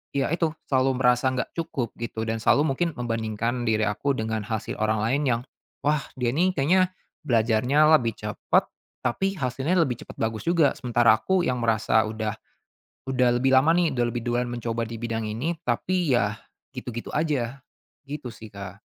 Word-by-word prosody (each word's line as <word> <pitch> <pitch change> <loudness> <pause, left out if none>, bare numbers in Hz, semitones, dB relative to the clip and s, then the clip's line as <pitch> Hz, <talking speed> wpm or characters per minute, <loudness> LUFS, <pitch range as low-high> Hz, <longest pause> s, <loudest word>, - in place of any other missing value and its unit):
ya 140 +2 +1
itu, 165 -1 +1 0.2
selalu 130 -1 +2
merasa 125 +1 +3
nggak 130 - -3
cukup 135 -7 -3
gitu 110 -1 -4
dan 115 0 -2
selalu 140 +3 +3
mungkin 175 +5 +1
membandingkan 115 0 -2
diri 110 -1 +2
aku 140 +7 0
dengan 110 -1 -2
hasil 110 -2 -4
orang 110 0 +2
lain 130 +6 +1
yang 115 0 +1 0.4
wah, 150 0 +3 0.2
dia 120 -1 +1
nih 180 +6 +3
kayaknya 180 +7 +3 0.3
belajarnya 120 +5 +3
lebih 115 -2 -1
cepat, 105 0 0 0.4
tapi 195 +10 0
hasilnya 135 +6 0
lebih 125 -7 0
cepat - - -11
bagus 110 -1 -2
juga. 165 -5 +4
Sementara 120 -2 +4
aku 190 -1 +2
yang 125 -3 -1
merasa 110 -1 +3
udah 110 0 -3 0.8
udah 125 -1 +3
lebih 135 +1 +3
lama 150 +5 +5
nih, 170 -5 +2
udah 120 - +2
lebih 120 - -2
duluan 120 +1 0
mencoba 115 -1 -2
di 115 - -6
bidang 115 -1 -2
ini, 140 +11 -2
tapi 165 +5 0
ya 105 -2 +1 0.4
gitu-gitu 120 -1 -6
aja, 135 -4 -1 0.5
gitu 140 -3 -5
sih, 110 0 -11
Kak. 100 0 -8
125 Hz, 170 wpm, -25 LUFS, 115-140 Hz, 0.8 s, lama